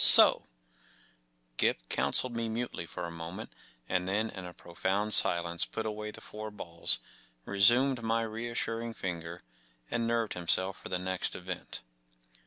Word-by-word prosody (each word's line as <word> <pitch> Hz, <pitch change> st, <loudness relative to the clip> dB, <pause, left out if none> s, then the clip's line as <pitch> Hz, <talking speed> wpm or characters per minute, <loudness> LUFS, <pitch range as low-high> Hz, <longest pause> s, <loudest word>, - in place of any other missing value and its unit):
So -, -, +12 dB
f -, -, -7 dB
n -, -, -29 dB, 1.1 s
Gip -, -, +1 dB
counselled 125 Hz, -2 st, +3 dB
me 115 Hz, -1 st, -2 dB
mutely 115 Hz, -6 st, -4 dB
for -, -, -6 dB
a 85 Hz, -, -6 dB
moment, 85 Hz, +6 st, -7 dB, 0.3 s
and 90 Hz, 0 st, 0 dB
then 110 Hz, +3 st, 0 dB
in 95 Hz, -2 st, -8 dB
a 90 Hz, -, -10 dB
pro 85 Hz, -, -14 dB
found 100 Hz, +5 st, 0 dB
silence 85 Hz, 0 st, +4 dB
put 110 Hz, -, -4 dB
away 105 Hz, 0 st, -4 dB
the -, -, -8 dB
four 110 Hz, 0 st, -7 dB
balls, 85 Hz, -5 st, -1 dB, 0.5 s
re¬ 100 Hz, 0 st, -4 dB
sumed 125 Hz, +4 st, +5 dB
my 115 Hz, 0 st, 0 dB
reassuring 115 Hz, 0 st, -4 dB
finger, 85 Hz, -1 st, -5 dB, 0.5 s
and 115 Hz, -1 st, 0 dB
nerved 115 Hz, -2 st, 0 dB
himself 95 Hz, +2 st, 0 dB
for -, -, -9 dB
the 90 Hz, -, 0 dB
next 95 Hz, 0 st, -2 dB
event. 90 Hz, 0 st, -7 dB
105 Hz, 165 wpm, -31 LUFS, 90-115 Hz, 1.1 s, So